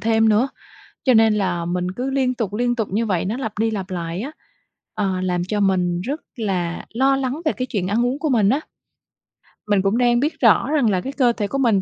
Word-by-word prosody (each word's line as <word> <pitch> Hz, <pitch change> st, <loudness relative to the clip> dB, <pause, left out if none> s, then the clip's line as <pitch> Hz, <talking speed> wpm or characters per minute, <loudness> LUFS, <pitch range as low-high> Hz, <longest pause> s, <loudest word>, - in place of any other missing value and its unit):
thêm 225 Hz, 0 st, +3 dB
nữa, 220 Hz, +6 st, +3 dB, 0.6 s
cho 260 Hz, -, +4 dB
nên 225 Hz, -1 st, +5 dB
là 180 Hz, -5 st, -1 dB
mình 180 Hz, +1 st, -2 dB
cứ 250 Hz, +8 st, -3 dB
liên 260 Hz, -2 st, +1 dB
tục, 220 Hz, -5 st, -3 dB
liên 240 Hz, +2 st, 0 dB
tục 225 Hz, -4 st, -1 dB
như 225 Hz, +4 st, 0 dB
vậy, 185 Hz, -5 st, 0 dB
nó 215 Hz, +6 st, -2 dB
lặp 220 Hz, -6 st, -5 dB
đi 225 Hz, 0 st, +1 dB
lặp 195 Hz, -2 st, -4 dB
lại 170 Hz, +1 st, -3 dB
á, 280 Hz, +5 st, -5 dB, 0.6 s
ờ, 190 Hz, -3 st, -1 dB
làm 180 Hz, -1 st, 0 dB
cho 205 Hz, +3 st, -2 dB
mình 180 Hz, -3 st, +1 dB
rất 285 Hz, -, -4 dB
là 180 Hz, -6 st, -2 dB
lo 270 Hz, +3 st, +3 dB
lắng 270 Hz, +3 st, -2 dB
về 310 Hz, -, +3 dB
cái 255 Hz, -, -3 dB
chuyện 195 Hz, -7 st, -2 dB
ăn 225 Hz, +5 st, +1 dB
uống 260 Hz, +4 st, -1 dB
của 310 Hz, -, -1 dB
mình 215 Hz, -6 st, +3 dB
á. 275 Hz, -, +2 dB, 1.1 s
Mình 205 Hz, -2 st, +3 dB
cũng 200 Hz, +4 st, +1 dB
đang 240 Hz, -1 st, +3 dB
biết 300 Hz, +4 st, -1 dB
rõ 235 Hz, +3 st, +4 dB
rằng 285 Hz, -7 st, +3 dB
là 185 Hz, -3 st, +1 dB
cái 270 Hz, -, -5 dB
cơ 250 Hz, -4 st, +3 dB
thể 205 Hz, -3 st, -2 dB
của 275 Hz, -, -3 dB
mình 230 Hz, -8 st, +3 dB
220 Hz, 240 wpm, -21 LUFS, 190-250 Hz, 1.1 s, nên